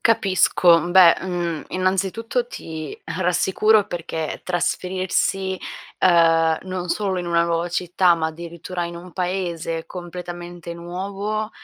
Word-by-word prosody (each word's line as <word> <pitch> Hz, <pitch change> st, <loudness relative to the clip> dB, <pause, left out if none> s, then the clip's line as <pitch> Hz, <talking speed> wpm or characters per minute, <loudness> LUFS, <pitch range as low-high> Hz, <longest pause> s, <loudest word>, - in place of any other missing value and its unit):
Capisco. 185 Hz, -6 st, +4 dB
Beh, 175 Hz, -2 st, +7 dB
mhmm, 175 Hz, -4 st, -3 dB
innanzitutto 195 Hz, +6 st, -1 dB
ti 160 Hz, -, -7 dB
rassicuro 185 Hz, +5 st, +2 dB
perché 160 Hz, -3 st, -4 dB
trasferirsi, 185 Hz, +1 st, -1 dB, 0.4 s
ehm, 165 Hz, -2 st, +4 dB
non 185 Hz, -1 st, -5 dB
solo 195 Hz, 0 st, -1 dB
in 175 Hz, -, -4 dB
una 170 Hz, 0 st, +2 dB
nuova 170 Hz, 0 st, 0 dB
città, 180 Hz, 0 st, +2 dB
ma 160 Hz, -1 st, -1 dB
addirittura 170 Hz, +2 st, -5 dB
in 170 Hz, 0 st, -6 dB
un 175 Hz, +1 st, -11 dB
paese 175 Hz, -3 st, -3 dB
completamente 175 Hz, -1 st, -7 dB
nuovo, 200 Hz, +5 st, -4 dB
175 Hz, 115 wpm, -22 LUFS, 170-190 Hz, 0.4 s, Beh